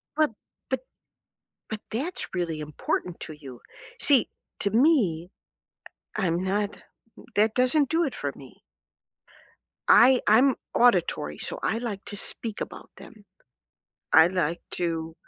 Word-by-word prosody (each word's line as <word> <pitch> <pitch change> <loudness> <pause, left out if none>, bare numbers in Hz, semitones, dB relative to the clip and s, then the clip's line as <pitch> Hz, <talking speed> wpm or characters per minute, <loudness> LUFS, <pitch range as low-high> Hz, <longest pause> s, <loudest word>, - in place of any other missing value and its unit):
But 310 -5 +3 0.4
but - - +1 0.9
but 220 -1 -5
that's 290 +11 -4
really 170 -4 -2
important 150 +3 -3
to 155 - -7
you. 135 -5 -11 0.4
See, 275 -4 +3 0.3
to 200 - 0
me, 215 - +3 0.8
I 195 -4 0
I'm 170 +2 0
not 205 +2 -2 0.5
that 215 +1 +3
doesn't 255 +3 +3
do 330 +1 +2
it 275 - -3
for - - -3
me. - - -14 1.3
I 255 +1 +7
I'm 250 +5 +5 0.2
auditory, 175 - +2
so - - -6
I 225 - +1
like 225 -5 -4
to 205 - -6
speak 220 +1 -3
about - - -7
them. 215 -3 -14 0.9
I 160 - +9
I - - +4
like 175 -2 -1
to, 165 -2 -2
205 Hz, 135 wpm, -26 LUFS, 170-245 Hz, 1.3 s, I